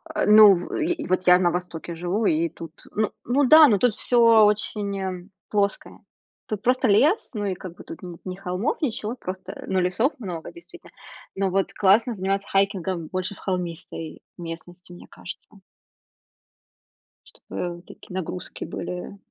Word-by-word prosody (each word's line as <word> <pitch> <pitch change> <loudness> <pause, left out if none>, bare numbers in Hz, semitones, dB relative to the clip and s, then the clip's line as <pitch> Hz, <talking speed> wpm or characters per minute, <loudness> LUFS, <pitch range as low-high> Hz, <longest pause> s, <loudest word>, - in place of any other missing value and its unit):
Э, - - +1
ну 210 -1 +9
в, 175 -1 -4
и, 330 -1 -1
вот, 185 0 0
я 180 0 +8
на 175 -2 +2
востоке 175 -1 -5
живу, 180 +6 -1
и 165 -1 +2
тут, 165 -1 -10 0.2
ну 215 0 -1
ну 270 +4 +2
да, 310 +1 +9
ну 215 -6 +3
тут 245 0 +3
всё 230 -3 +5
очень 200 -3 -2 0.2
плоское. 200 -1 -1 0.5
Тут 210 -2 -4
просто 255 0 +2
лес, 290 - +3
ну, 205 -1 -2
и 195 - -1
как 180 -1 -9
бы - - -12
тут - - -10
нет 175 -2 -9
ни 185 -1 -5
холмов, 190 +5 -3
ничего, 230 -5 -2
просто, 185 -4 -7
ну, 190 - +1
лесов 185 - +1
много 180 - -6
действительно. 345 0 -15 0.4
Но, 195 -1 0
вот, 195 +1 0
классно 215 +4 +3
заниматься 195 +1 -2
хайкингом 190 -3 0
больше 185 +1 -4
в - - -18
холмистой 170 -3 -5
местности, 175 +1 -9
мне 175 - -12
кажется. 195 +3 -11 1.7
Чтобы, 175 -1 -7
такие, - - -13
нагрузки 180 0 -5
были, 180 +2 -6
190 Hz, 160 wpm, -24 LUFS, 180-215 Hz, 1.7 s, ну